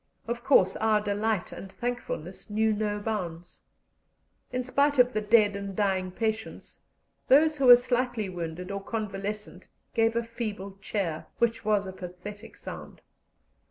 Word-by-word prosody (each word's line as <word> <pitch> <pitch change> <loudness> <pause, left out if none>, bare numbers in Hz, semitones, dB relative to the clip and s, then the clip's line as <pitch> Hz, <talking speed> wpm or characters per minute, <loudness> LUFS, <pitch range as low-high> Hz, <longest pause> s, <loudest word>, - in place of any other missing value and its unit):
Of 235 0 -3
course 195 -9 +5
our 220 -1 +3
delight 210 -1 -1
and 195 - -9
thankfulness 235 -8 -5
knew 220 +1 +2
no 210 0 -1
bounds. 180 -6 -4 0.9
In 255 0 -1
spite 280 +3 +2
of 250 0 +5
the 215 - 0
dead 210 -1 +4
and 200 -1 -5
dying 190 -2 +1
patients, 220 +3 -4 0.5
those 305 +3 +5
who 265 - +3
were 245 - +12
slightly 245 -3 -1
wounded 180 +1 -5
or 200 0 -4
convalescent 210 -1 -4 0.3
gave 225 -1 +2
a 235 - +1
feeble 210 -4 -6
cheer, 180 -7 -3
which 230 -1 +1
was 210 -2 +2
a 190 - -6
pathetic 190 +4 -9
sound. - - -9
210 Hz, 145 wpm, -28 LUFS, 195-230 Hz, 0.9 s, were